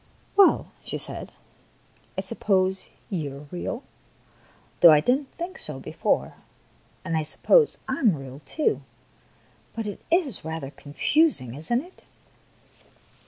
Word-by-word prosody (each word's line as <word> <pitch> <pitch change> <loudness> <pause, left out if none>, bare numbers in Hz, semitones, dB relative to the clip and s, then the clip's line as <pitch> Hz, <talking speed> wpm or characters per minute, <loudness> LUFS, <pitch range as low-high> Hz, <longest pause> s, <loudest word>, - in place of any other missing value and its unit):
" - - -34
Well," 400 -2 +5
she - - -4
said, - - -4 0.4
" - - -34
I - - +1
suppose 190 -1 0 0.2
you 150 -7 -3
are 145 +1 -12
real, 230 +8 -4 1.0
though 170 - +10
I 155 -2 +8
did 245 +12 +3
n't 280 - -14
think 350 +2 -6
so - - -5
before; - - -1 0.7
and 165 -3 -1
I 160 - +2
sup 155 - -2
pose 480 -3 +5
I 260 0 -2
am 215 - +4
real, 135 0 -9
too; 370 +8 0 0.9
but 225 -1 -3
it 205 - -6
is 330 - +1
rather 160 -4 -5
confusing, 145 - +1
is 155 - -6
n't 240 +3 +2
it?" 360 +2 -17
190 Hz, 150 wpm, -25 LUFS, -, 1.0 s, though